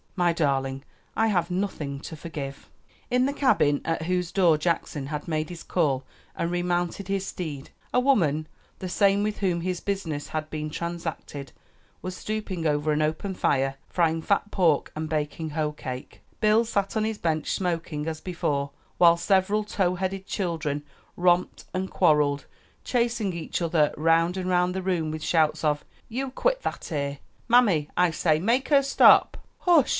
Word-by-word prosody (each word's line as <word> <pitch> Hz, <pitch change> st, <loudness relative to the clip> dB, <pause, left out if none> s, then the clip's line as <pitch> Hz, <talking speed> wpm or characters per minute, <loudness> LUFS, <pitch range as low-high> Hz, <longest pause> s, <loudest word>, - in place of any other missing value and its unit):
"My 175 Hz, -2 st, +2 dB
darling, 135 Hz, -4 st, 0 dB, 0.3 s
I 225 Hz, -, +3 dB
have 175 Hz, -5 st, +1 dB
nothing 180 Hz, -7 st, -3 dB
to 160 Hz, -, -7 dB
forgive." 150 Hz, -4 st, -7 dB, 0.4 s
In 250 Hz, +1 st, +3 dB
the 280 Hz, -, 0 dB
cabin 200 Hz, -, +3 dB
at 165 Hz, -1 st, -1 dB
whose 180 Hz, 0 st, -1 dB
door 175 Hz, -5 st, +4 dB
Jackson 155 Hz, -3 st, -1 dB
had 150 Hz, +2 st, -5 dB
made 155 Hz, -1 st, -1 dB
his 175 Hz, -2 st, -8 dB
call 140 Hz, -7 st, +1 dB, 0.3 s
and 170 Hz, -, -1 dB
remounted 175 Hz, +1 st, -1 dB
his 195 Hz, -1 st, -1 dB
steed, 150 Hz, -8 st, -6 dB, 0.2 s
a -, -, +4 dB
woman 165 Hz, -, +2 dB, 0.3 s
the 185 Hz, -, -4 dB
same 200 Hz, +2 st, +3 dB
with 210 Hz, 0 st, -2 dB
whom 180 Hz, -4 st, 0 dB
his 180 Hz, 0 st, -2 dB
business 165 Hz, -8 st, -3 dB
had 155 Hz, -1 st, -3 dB
been 155 Hz, 0 st, -3 dB
transacted 165 Hz, -4 st, -5 dB, 0.5 s
was 185 Hz, 0 st, -4 dB
stooping 200 Hz, -7 st, -3 dB
over 150 Hz, +1 st, +1 dB
an 150 Hz, 0 st, +1 dB
open 160 Hz, +6 st, -1 dB
fire, 135 Hz, -6 st, +1 dB
frying 165 Hz, -2 st, +1 dB
fat 200 Hz, +4 st, +1 dB
pork 165 Hz, -7 st, +2 dB
and 155 Hz, 0 st, -3 dB
baking 155 Hz, +1 st, -2 dB
hoe 150 Hz, 0 st, -1 dB
cake. 130 Hz, -3 st, -7 dB, 0.2 s
Bill 215 Hz, +2 st, +4 dB
sat 200 Hz, -1 st, -1 dB
on 215 Hz, -, +1 dB
his 220 Hz, -1 st, -1 dB
bench 160 Hz, -4 st, -1 dB
smoking 165 Hz, -4 st, -2 dB
as 160 Hz, -1 st, -4 dB
before, 145 Hz, -6 st, -2 dB, 0.3 s
while 170 Hz, -1 st, +7 dB
several 195 Hz, +4 st, +2 dB
tow 190 Hz, -3 st, 0 dB
headed 190 Hz, +1 st, -3 dB
children 160 Hz, -6 st, -2 dB, 0.3 s
romped 175 Hz, 0 st, +2 dB
and 185 Hz, +1 st, -2 dB
quarreled, 150 Hz, -5 st, +2 dB, 0.4 s
chasing 235 Hz, -5 st, 0 dB
each 165 Hz, -2 st, -3 dB
other 160 Hz, -3 st, +2 dB
round 165 Hz, +3 st, +3 dB
and 185 Hz, -1 st, -2 dB
round 180 Hz, 0 st, +2 dB
the 190 Hz, -, -2 dB
room 175 Hz, -4 st, 0 dB
with 155 Hz, 0 st, -5 dB
shouts 160 Hz, -2 st, +2 dB
of 150 Hz, -1 st, +1 dB, 0.3 s
"You 260 Hz, +4 st, -3 dB
quit -, -, 0 dB
that -, -, -4 dB
ere!" 140 Hz, -2 st, -2 dB, 0.3 s
"Mammy, 210 Hz, -11 st, +4 dB
I 180 Hz, -1 st, +4 dB
say, 155 Hz, -1 st, +2 dB
make 235 Hz, -, +1 dB
her 280 Hz, -2 st, +5 dB
stop." 275 Hz, -, +6 dB, 0.2 s
"Hush!" 335 Hz, -7 st, +4 dB
170 Hz, 170 wpm, -26 LUFS, 155-195 Hz, 0.5 s, while